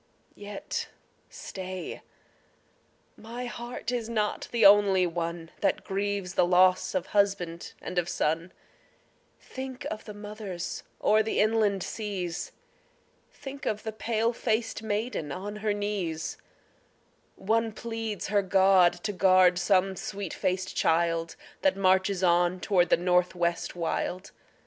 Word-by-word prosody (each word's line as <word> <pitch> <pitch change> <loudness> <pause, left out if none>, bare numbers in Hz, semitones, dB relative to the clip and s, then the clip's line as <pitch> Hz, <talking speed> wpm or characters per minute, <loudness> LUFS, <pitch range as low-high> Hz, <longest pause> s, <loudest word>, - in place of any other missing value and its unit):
Yet 205 0 -5 0.4
stay, 185 -1 -7 1.1
my 235 +3 -7
heart 240 -1 -5
is 235 -2 -2
not 215 -2 -1
the 230 -3 +3
only 200 -2 +6
one 170 -1 -4
That 195 -2 +1
grieves 200 -1 -2
the - - +3
loss 185 +2 +4
of 185 - 0
husband 195 -5 0
and 180 - -2
of 175 0 -2
son; 165 0 -1 0.9
Think 260 0 -7
of 215 - -6
the 210 - -8
mothers 205 -4 -6 0.2
o'er 215 +1 +5
the 220 - -1
inland 210 -3 +2
seas; 195 -6 -4 0.8
Think 275 +1 -8
of 215 -1 -1
the 220 - -3
pale 225 +1 0
faced 225 -1 -1
maiden 210 - -2
on 205 +6 -5
her 210 0 -1
knees; 200 -6 -2 1.0
One 225 +3 0
pleads 225 -2 -4
her 205 0 +3
God 190 -2 +5
to 210 - -1
guard 185 -1 +5
some 190 +1 +2
sweet 195 -1 -5
faced 185 +1 -2
child 165 0 +1 0.3
That 285 -7 +2
marches 190 0 +2
on 175 +1 +3
toward 180 -3 +2
the - - +5
North 180 +1 +2
West 170 0 -1
wild. 175 +2 -2
195 Hz, 130 wpm, -28 LUFS, 180-215 Hz, 1.1 s, only